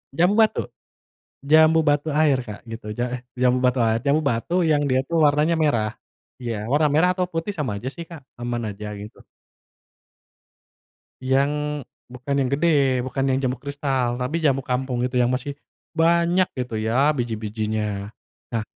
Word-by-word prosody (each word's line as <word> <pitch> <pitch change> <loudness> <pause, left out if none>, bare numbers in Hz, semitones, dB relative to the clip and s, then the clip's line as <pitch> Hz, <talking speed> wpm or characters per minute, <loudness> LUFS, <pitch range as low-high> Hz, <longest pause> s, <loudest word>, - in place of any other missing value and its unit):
Jambu 180 +7 +3
batu. 220 - +4 0.8
Jambu 155 +2 +5
batu 145 0 +1
air, 145 -3 +3
Kak 105 -4 -9
gitu. 115 -1 -8
Ja 120 - +1
eh, 125 - -4 0.2
jambu 125 0 +3
batu 125 0 +2
ai 110 0 +2
jambu 150 +3 +3
batu 115 +9 -2 0.2
yang 145 -1 +3
dia 130 - +3
tuh 170 - 0
warnanya 150 +3 +2
merah. 120 -9 +1 0.5
Iya. 110 -3 -3
Warna 150 +2 +4
merah 160 +4 +4
atau 180 -1 0
putih 165 +4 -3
sama 130 - -3
aja 125 - -5
sih, 170 - -7
Kak, 165 -4 -10 0.2
aman 120 -1 -2
aja 105 +1 -8 0.2
gitu. 105 - -12 2.0
Yang 145 +3 0 0.3
bukan 125 +3 -4
yang 130 -2 +1
gede, 140 -5 +2
bukan 130 +1 -2
yang 130 -1 +2
jambu 130 -1 -1
kristal. 135 -3 -2
Tapi 130 +7 -1
jambu 140 -4 +1
kampung 125 -1 -2
itu 125 0 -1
yang 125 +1 +2
masih 140 +2 -3 0.4
banyak 170 +2 +3
gitu 125 -4 -4
ya 120 +7 +2
biji-bijinya. 110 -3 -3 0.4
Nah 115 -2 0
135 Hz, 160 wpm, -23 LUFS, 120-150 Hz, 2.0 s, Jambu